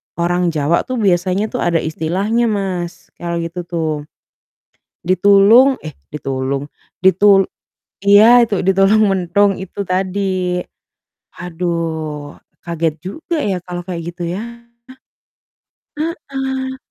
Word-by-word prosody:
orang 175 +1 0
Jawa 160 0 0
tuh 255 - -3
biasanya 195 -1 +1
tuh - - -3
ada 170 -1 +1
istilahnya 190 +9 0
Mas, 190 -5 -3
kalau 170 0 -3
gitu 175 +1 -6
tuh, 165 -2 -2 1.2
ditulung 205 +8 +5
eh, 155 -2 -9 0.2
ditulung, 135 -1 -3 0.3
ditul 195 +1 +5 0.6
iya 220 +5 +7
itu 215 -5 -1
ditulung 195 +3 +3
mentung 195 +1 +2
itu 190 +1 -9
tadi, 185 +1 -1 1.2
aduh 165 -4 -4 0.3
kaget 165 -2 -1
juga 255 - -5
ya 190 -3 -1
kalau 175 0 -7
kayak 175 -3 -5
gitu 175 0 -7
ya, 195 - -4 1.6
heeh. 270 -5 -4
185 Hz, 105 wpm, -17 LUFS, 170-205 Hz, 1.6 s, iya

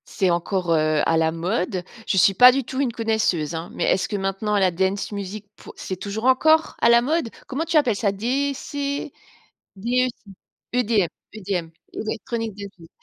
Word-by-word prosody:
C'est 190 -4 0
encore, 175 +1 -1
heu, 155 -1 +2
à 165 - +2
la 160 0 +2
mode? 180 +2 -2 0.2
Je 195 - +1
suis 195 +2 +5
pas 250 +6 +8
du 270 +1 -1
tout 260 +2 -5
une 260 -4 0
connaisseuse, 220 -9 0
hein. 165 +1 -5
Mais - - -3
est-ce 190 - +1
que 210 - -3
maintenant 195 +2 -1
la 190 -2 +3
dance 190 +4 -1
music 200 +1 -6
pour - - -13
c'est 185 - -5
toujours 205 +5 -5
encore 315 +5 +4
à 235 - +5
la 235 0 +6
mode? 300 0 0 0.2
Comment 285 +5 -2
tu 335 -1 +1
appelles 255 -8 +3
ça? 200 -1 0
DC, 280 +5 -2 0.6
DEC 250 +5 +1 0.6
EDM 230 -6 +2 0.3
EDM, 190 -5 -3 0.2
Electronic 225 0 -4
dance 200 -1 -7
music. 165 -1 -15
210 Hz, 180 wpm, -23 LUFS, 185-250 Hz, 0.6 s, pas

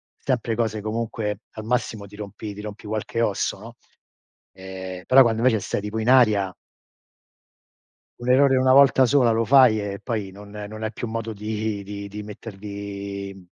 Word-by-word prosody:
sempre 120 -4 -1
cose 110 -2 -1
comunque 110 -1 -3
al 110 - -7
massimo 115 -2 -2
ti 100 +1 -13
rompi 105 0 -7
ti 105 - -8
rompi 105 0 -8
qualche 110 +2 -2
osso, 100 -3 0
no. 115 +3 -11 0.8
Ehm, 95 -1 -8
però 135 +1 +7
quando 115 -3 +3
invece 120 -3 +3
stai 100 - -3
tipo 105 +2 -4
in 110 +2 0
aria 105 -7 +4 1.7
un 120 - -6
errore 135 +1 +5
una 130 0 +4
volta 135 -1 +6
sola 125 -2 +4
lo 115 +1 +1
fai 130 -4 +6
e 100 -1 -4
poi 105 -6 -3
non 100 +2 -12
non 105 +1 -7
hai 110 - -2
più 115 - -5
modo 115 0 -4
di 105 0 -3
di 100 0 -7
di 105 +1 -7
mettergli, 100 -2 -7
110 Hz, 170 wpm, -23 LUFS, 100-115 Hz, 1.7 s, però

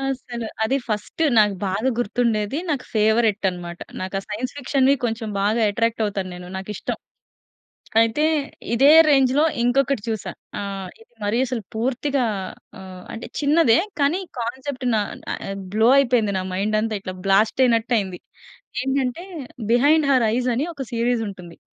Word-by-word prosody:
అస్సల. 255 -3 -4 0.2
అదీ 265 +5 +1
ఫస్ట్ 215 +8 -3 0.2
నాకు 210 -2 +4
బాగా 205 +7 0
గుర్తుండేది. 230 +1 0
నాకు 275 -4 -1
ఫేవరెట్ 220 -1 +3
అనమాట. 175 -1 -8 0.2
నాకు 185 +1 -5
ఆ - - -3
సైన్స్ 225 +5 -3
ఫిక్షన్‌వి 275 0 +3
కొంచెం 225 -1 -2
బాగా 215 +3 +2
ఎట్రాక్ట్ 230 +2 0
అవుతాను 195 -3 -3
నేను. 180 0 -9
నాకు 190 +2 -6
ఇష్టం. - - -4 1.0
అయితే, 230 +6 +1 0.5
ఇదే 270 +5 +5 0.2
రేంజ్‌లో 270 +1 +4 0.2
ఇంకొకటి 265 0 +2
చూశా. 210 -5 -3 0.3
ఆహ్, 195 -2 -5
ఇది 225 - -21
మరీ 205 +3 0
అసలు 245 -2 -3
పూర్తిగా 260 +3 0 0.5
ఆహ్, 185 -1 -10
అంటే 225 - -7
చిన్నదే. 290 -4 +4 0.2
కానీ 290 +6 +2 0.2
కాన్సెప్ట్ 260 +3 -4
నా 215 - +2 0.3
ఆహ్, 195 - -5 0.2
బ్లో 220 +2 +4
అయిపోయింది 240 -6 +3
నా 185 - -3
మైండ్ 205 +3 0
అంతా. 225 -1 -2
ఇట్ల 185 - -6
బ్లాస్ట్ 210 +6 +3
అయినట్టు 230 0 +1
అయింది. 190 -3 -5 0.6
ఏంటంటే, 270 +4 -1 0.5
'బిహైండ్ 290 +5 +4
హర్ 250 -3 +4
ఐస్' 250 0 0
అని 285 - 0
ఒక 270 -2 -5
సీరీస్ 235 0 +1
ఉంటుంది. 180 -4 -10
230 Hz, 150 wpm, -22 LUFS, 205-260 Hz, 1.0 s, ఇదే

